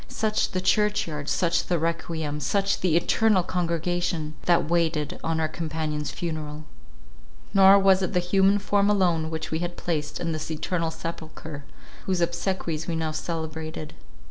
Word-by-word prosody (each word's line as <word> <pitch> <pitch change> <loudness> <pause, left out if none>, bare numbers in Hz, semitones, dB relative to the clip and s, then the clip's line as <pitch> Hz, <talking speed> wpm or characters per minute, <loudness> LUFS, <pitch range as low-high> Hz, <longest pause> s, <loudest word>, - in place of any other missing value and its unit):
Such 215 -1 0
the 185 - 0
church 210 +2 +2
yard, 150 -2 -4
such 170 +2 +1
the 175 - +1
requiem, 160 -2 -2
such 195 +7 +1
the 170 -3 +3
eternal 210 +2 +3
congregation, 170 -2 -1
that 175 -3 +3
waited 165 -3 0
on 165 0 0
our 160 - +1
companion's 155 -2 -3
funeral! 155 -3 -5 0.9
Nor 195 0 +8
was 195 -1 +5
it 185 - -1
the 180 - +3
human 195 +3 +3
form 205 0 +2
alone 175 -6 +2
which 160 -1 -4
we 160 - 0
had 175 0 -4
placed 150 -4 -2
in 165 - -2
this 155 0 -4
eternal 165 +1 -1
sepulchre, 160 -3 -7 0.4
whose 185 -2 +1
obsequies 170 -2 -1
we 170 - -1
now 160 -1 -1
celebrated. 155 -1 -5
165 Hz, 155 wpm, -26 LUFS, 155-185 Hz, 0.9 s, Nor